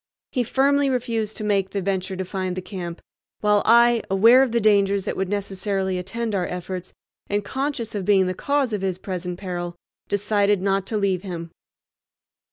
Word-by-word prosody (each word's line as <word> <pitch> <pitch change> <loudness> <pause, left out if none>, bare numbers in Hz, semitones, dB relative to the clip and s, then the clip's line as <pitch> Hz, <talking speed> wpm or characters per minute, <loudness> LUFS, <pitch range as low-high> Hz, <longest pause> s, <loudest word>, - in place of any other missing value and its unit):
He 250 - 0
firmly 275 +3 +2
refused 230 -4 -2
to - - -4
make 200 -2 +1
the 200 - -2
venture 190 0 -2
to 190 0 -3
find 185 -1 -3
the - - -2
camp, 180 -3 -6 0.4
while 210 -1 +4
I, 235 0 +6
aware 225 +7 +6
of 265 -3 +2
the 235 - +2
dangers 200 -2 +3
that - - -2
would 190 -1 -2
necessarily 195 -1 -1
attend 220 +5 -3
our 185 -3 0
efforts, 180 0 -5 0.4
and 205 0 -1
conscious 265 -3 -3
of 205 -2 -2
being 195 -1 +4
the 185 - -1
cause 280 +2 0
of 205 - -1
his 190 -2 -1
present 180 -2 -5
peril, 175 -2 -5 0.3
decided 205 0 +2
not 195 0 0
to 220 - -1
leave 195 -3 +1
him. 170 -4 -6
200 Hz, 180 wpm, -23 LUFS, 185-220 Hz, 0.4 s, I